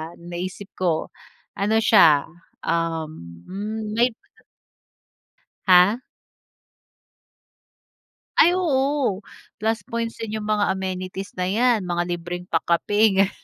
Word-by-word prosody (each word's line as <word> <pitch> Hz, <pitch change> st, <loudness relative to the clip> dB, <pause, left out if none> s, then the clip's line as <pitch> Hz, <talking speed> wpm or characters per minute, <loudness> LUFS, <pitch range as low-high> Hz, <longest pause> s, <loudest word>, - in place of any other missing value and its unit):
ang 170 Hz, +1 st, -13 dB
naisip 185 Hz, +3 st, -6 dB
ko? 170 Hz, -4 st, 0 dB, 0.5 s
Ano 210 Hz, +3 st, +1 dB
siya, 155 Hz, -11 st, +6 dB, 0.4 s
um, 155 Hz, -, -3 dB
hmm 210 Hz, +2 st, -5 dB
may 240 Hz, 0 st, +3 dB, 1.5 s
Ha? 190 Hz, +7 st, +6 dB, 2.3 s
Ay 350 Hz, +2 st, +6 dB
oo. 275 Hz, -, 0 dB, 0.4 s
Plus 225 Hz, +1 st, +1 dB
points 230 Hz, 0 st, -4 dB
din 220 Hz, -1 st, -4 dB
yung 210 Hz, -, -6 dB
mga 205 Hz, -2 st, +2 dB
amenities 190 Hz, +1 st, -5 dB
na 180 Hz, -, 0 dB
'yan, 220 Hz, +1 st, +2 dB
mga 175 Hz, 0 st, -1 dB
libreng 175 Hz, +1 st, -6 dB
pa-kape 195 Hz, +5 st, +2 dB
ganun. 195 Hz, -, +2 dB
195 Hz, 105 wpm, -23 LUFS, 175-220 Hz, 2.3 s, siya